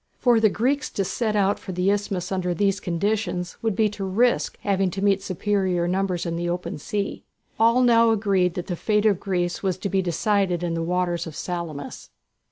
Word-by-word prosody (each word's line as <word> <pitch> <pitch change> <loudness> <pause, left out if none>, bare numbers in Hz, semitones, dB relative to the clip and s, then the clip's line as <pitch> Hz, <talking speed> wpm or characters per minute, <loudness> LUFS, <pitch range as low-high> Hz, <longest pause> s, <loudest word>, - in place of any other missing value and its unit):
For 240 -3 +4
the 220 -1 +4
Greeks 270 +8 0
to 195 - -1
set 215 +2 -1
out 200 -1 +2
for 190 - -7
the 180 +2 +2
isthmus 200 -3 -2
under 180 -2 -1
these 200 +1 +1
circumstances 180 -1 -2
would 225 -3 0
be 220 +1 +3
to 205 -1 -6
risk 225 +6 +1
having 195 -2 +1
to 195 +2 -5
meet 195 -1 +3
superior 190 -2 0
numbers 185 -1 -1
in 170 -1 -2
the 175 0 -2
open 175 -2 -4
sea. 200 +7 -3 0.4
All 230 +3 +4
now 230 -1 +5
agreed 195 -5 +1
that 180 - -4
the 180 - -3
fate 210 +4 +1
of 200 -4 +3
Greece 175 -3 -2
was 185 -2 -1
to 195 - -3
be 190 0 +1
decided 185 0 0
in 170 -1 -1
the 165 - -2
waters 175 0 -1
of 155 - -8
Salamis. 170 -6 -5
195 Hz, 200 wpm, -24 LUFS, 175-210 Hz, 0.4 s, now